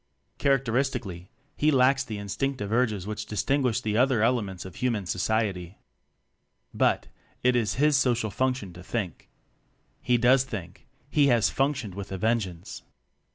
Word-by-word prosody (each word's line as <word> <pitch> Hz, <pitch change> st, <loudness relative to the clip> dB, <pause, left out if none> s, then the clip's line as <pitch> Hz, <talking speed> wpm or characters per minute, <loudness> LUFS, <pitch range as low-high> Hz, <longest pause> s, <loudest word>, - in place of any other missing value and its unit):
Characteristically 125 Hz, -8 st, 0 dB, 0.3 s
he 150 Hz, -, +2 dB
lacks 135 Hz, -1 st, +4 dB
the 110 Hz, -5 st, -6 dB
instinctive 105 Hz, +2 st, -3 dB
urges 110 Hz, -5 st, +1 dB
which 105 Hz, 0 st, -5 dB
distinguish 125 Hz, +3 st, 0 dB
the 105 Hz, 0 st, -1 dB
other 125 Hz, -3 st, +3 dB
elements 105 Hz, -7 st, 0 dB
of 95 Hz, -, -10 dB
human 115 Hz, -6 st, -1 dB
society. 95 Hz, -1 st, -1 dB, 1.0 s
But, -, -, +1 dB, 0.3 s
it 125 Hz, 0 st, +4 dB
is 110 Hz, -4 st, +1 dB
his 150 Hz, +1 st, +3 dB
social 120 Hz, -4 st, +1 dB
function 125 Hz, -4 st, -1 dB
to 90 Hz, -, -11 dB
think. 95 Hz, -3 st, -4 dB, 0.7 s
He 125 Hz, -1 st, +2 dB
does 125 Hz, +2 st, +4 dB
think 95 Hz, -9 st, -8 dB, 0.2 s
he 145 Hz, -2 st, +4 dB
has 120 Hz, -5 st, +3 dB
functioned 135 Hz, -7 st, -1 dB
with 100 Hz, +1 st, -7 dB
a 95 Hz, -, -3 dB
vengeance! 95 Hz, -5 st, -2 dB
115 Hz, 140 wpm, -27 LUFS, 100-130 Hz, 1.0 s, lacks